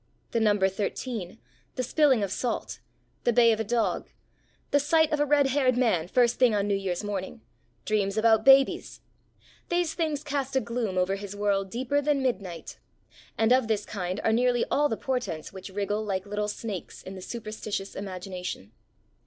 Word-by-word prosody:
The 230 - +1
number 205 -3 +3
thirteen, 200 +1 -4 0.4
the 255 - -1
spilling 260 -3 +3
of 195 - -2
salt, 245 +4 -3 0.4
the 240 - +3
bay 235 0 +5
of 220 - 0
a - - +1
dog, 230 +1 -1 0.6
the 285 - +4
sight 315 +2 +3
of 300 - +1
a 295 - +2
red 285 -1 +4
haired 260 -2 +2
man 200 -10 +2
first 240 +3 +2
thing 245 -4 +5
on 200 0 0
New 205 - +1
Year's 195 -1 -2
morning, 205 +2 -4 0.4
dreams 205 -1 0
about 220 0 +4
babies 270 +1 +4 0.7
these 345 -2 +1
things 310 -3 -2
cast 280 -2 -3
a - - +5
gloom 230 -5 -3
over 185 +2 +1
his 200 0 -7
world 200 -1 0
deeper 260 +6 0
than 285 -1 +1
midnight; 190 -9 -3 0.6
and 225 +1 +2
of 255 -3 +3
this 210 -2 0
kind 185 -1 -4
are 225 - +2
nearly 245 +1 +2
all 295 0 +3
the 225 - -2
portents 210 - -3
which 190 +1 -8
wriggle 205 +2 -2
like 190 -2 -2
little 210 +1 -2
snakes 210 -2 -6
in 190 - -8
the 190 - -8
superstitious 215 -2 -5
imagination. 185 - -6
220 Hz, 175 wpm, -27 LUFS, 195-255 Hz, 0.7 s, bay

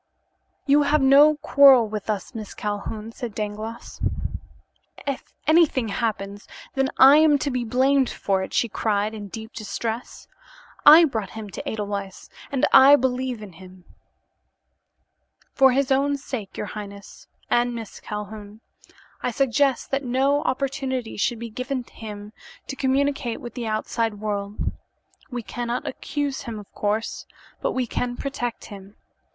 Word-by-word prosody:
"You 285 +1 +5
have 290 0 +2
no 285 +3 +7
quarrel 270 -6 +7
with 210 0 -6
us, 210 +3 -3
Miss 215 -3 -7
Calhoun," 210 +1 -4
said 235 -3 -7
Dangloss. 215 +2 -6 1.0
"If 275 -2 -3 0.2
anything 310 -7 +3
happens, 205 -2 -3 0.3
then, 270 0 +1
I 270 +3 +9
am 310 -2 +5
to 280 +1 -2
be 250 -1 -1
blamed 260 +3 +2
for 195 -1 -1
it," 190 - -5
she 235 - +1
cried 210 -1 -1
in 210 -2 -7
deep 220 +3 -9
distress. 225 +2 -5 0.6
"I 320 +3 +10
brought 220 - -3
him 210 -2 -7
to - - -5
Edelweiss, 200 -3 -5 0.2
and 270 -2 +2
I 270 +2 +9
believe 255 -3 -1
in 195 -4 -10
him." 185 +1 -15 1.7
"For 265 -1 +6
his 270 +1 +1
own 280 +1 +2
sake, 235 -7 -6
your - - -3
highness, 200 -1 -9 0.2
and 240 0 +2
Miss 225 -3 -8
Calhoun, 210 0 -7 0.6
I - - 0
suggest 270 +1 +1
that 275 +1 0
no 270 +3 +2
opportunity 260 -2 -2
should 235 +3 0
be 230 0 -7
given 255 +2 -3
him 210 -2 -9 0.3
to 270 - -6
communicate 270 -2 0
with 240 - -8
the 240 -3 -4
outside 220 0 -1
world. 205 -1 -3 0.6
We 245 -3 -5
cannot 240 +2 -4
accuse 285 0 -3
him, 230 -2 -6
of 205 -1 -12
course, 210 +2 -2 0.3
but - - -1
we 255 -1 0
can 245 +1 -3
protect 245 -4 -4
him. 200 0 -11
235 Hz, 145 wpm, -24 LUFS, 210-270 Hz, 1.7 s, I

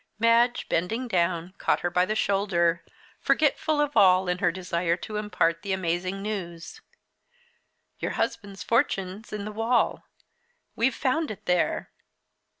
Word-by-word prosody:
Madge, 230 +2 +3
bending 220 +9 -1
down, 175 -3 0
caught - - +1
her 175 - -1
by 180 +1 +3
the 215 - -1
shoulder, 175 -5 +1 0.4
forgetful 310 -2 +1
of 295 -1 0
all 185 -1 +5
in 180 0 -1
her 175 - +2
desire 170 -1 -1
to 210 +4 -6
impart 170 -6 0
the 200 -2 -2
amazing 185 +2 -2
news. 190 - -6 1.2
"Your - - -2
husband's 200 -3 -3
fortune's 215 -4 -1
in 210 -1 -4
the 215 - -5
wall 225 +3 +1 0.7
we've 235 +2 +1
found 310 +4 0
it 210 - -8
there." 180 -1 0
195 Hz, 140 wpm, -26 LUFS, 175-225 Hz, 1.2 s, all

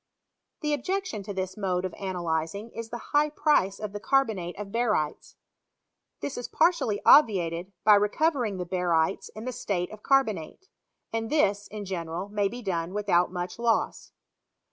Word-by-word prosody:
The 300 -2 0
objection 370 - -2
to 200 - -6
this 190 -1 -3
mode 185 -3 -1
of 185 - -4
analyzing 180 +2 -3
is 230 0 -7
the 240 0 -8
high 295 +1 +4
price 295 - +2
of 210 -2 -5
the 205 - -4
carbonate 205 -6 0
of 200 -1 -6
barytes. 210 -10 -1 0.9
This 275 - -4
is 245 - -5
partly 310 - +2
obviated 180 - +5
by 215 - +7
recovering 215 - +2
the 180 - -3
barytes 175 -1 0
in 215 +2 -7
the 255 - -2
state 200 -7 -2
of 215 0 -10
carbonate; 270 - 0 0.4
and 225 0 -2
this, 205 -9 +2
in 210 -1 -7
general, 175 0 -4
may 205 -1 +1
be 240 +4 -7
done, 175 -1 -2
without 190 -4 +2
much 180 +3 -5
loss. 235 -1 0
205 Hz, 160 wpm, -27 LUFS, 180-240 Hz, 0.9 s, by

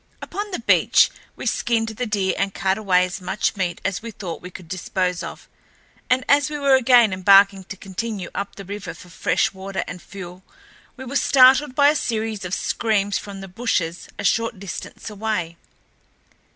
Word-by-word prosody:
Upon 410 +1 -5
the 365 - -3
beach, - - +4 0.2
we - - -8
skinned 225 -2 0
the 235 +3 -4
deer 200 -3 0
and 195 - -2
cut 190 +2 0
away 180 -4 +3
as 185 +1 -6
much 190 +4 -1
meat 185 -3 -2
as 195 -1 -1
we 230 - -7
thought 190 -6 -7
we 180 - -8
could 180 -1 -11
dispose 180 0 -2
of, - - -8 0.6
and 255 0 +2
as 285 0 +4
we 300 - -4
were 280 -1 +3
again 245 -5 +5
embarking 195 +1 +5
to 200 - -8
continue 195 0 -5
up 200 0 -4
the 195 - -9
river 195 -2 -6
for 180 - -14
fresh 170 - 0
water 190 0 -4
and 180 -1 -7
fuel, 180 -2 -10 0.6
we 260 - -8
were 260 +3 -6
startled 265 +1 +5
by 285 +1 +6
a 300 - +2
series 220 -6 -2
of 185 0 -2
screams 205 -3 0
from 200 -1 -9
the 195 - -8
bushes 180 -4 -2
a - - -5
short 230 +3 +1
distance 195 -3 -7
away. 200 -6 -3
200 Hz, 185 wpm, -22 LUFS, 185-230 Hz, 0.6 s, by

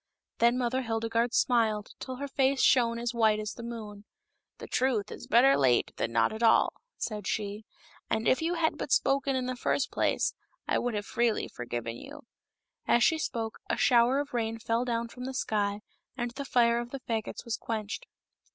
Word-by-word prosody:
Then 235 +1 +4
Mother 255 +1 0
Hildegarde 230 0 0
smiled 220 -4 +2
till 260 - -5
her 280 +2 -5
face 270 0 +1
shone 235 -2 +4
as 235 +1 -2
white 220 -2 +3
as 215 0 -4
the - - -9
moon. 215 -3 -7 0.3
" - - -53
The - - -8
truth 250 -6 0
is - - -9
better 255 +4 +6
late 125 -3 +2
than 115 - -1
not 115 - +2
at 220 - -6
all," 225 -1 +4 0.2
said 210 -3 -4
she: 210 0 -3 0.2
" - - -27
and 220 +1 0
if 260 - +3
you 335 +2 0
had 325 -1 0
but - - -4
spoken 275 0 +2
in 255 -1 -1
the 255 0 -2
first 260 +2 0
place, - - +1 0.3
I - - +2
would 245 -2 -2
have 205 0 -3
freely 235 -1 0
forgiven 120 -1 -5
you." 290 - -11 0.6
As 240 - +4
she 320 +4 +3
spoke 225 -7 -3
a - - 0
shower 245 +2 +4
of 290 0 -3
rain 225 -1 -1
fell 230 +2 -1
down 235 -1 -1
from 250 +2 -9
the 265 0 -5
sky, 205 -3 -1 0.4
and 240 -1 -2
the 280 +3 -6
fire 235 -2 +3
of 240 0 -5
the 275 - -6
fagots 225 0 -4
was 235 - -1
quenched. 215 -2 -4
235 Hz, 200 wpm, -29 LUFS, 220-255 Hz, 0.6 s, better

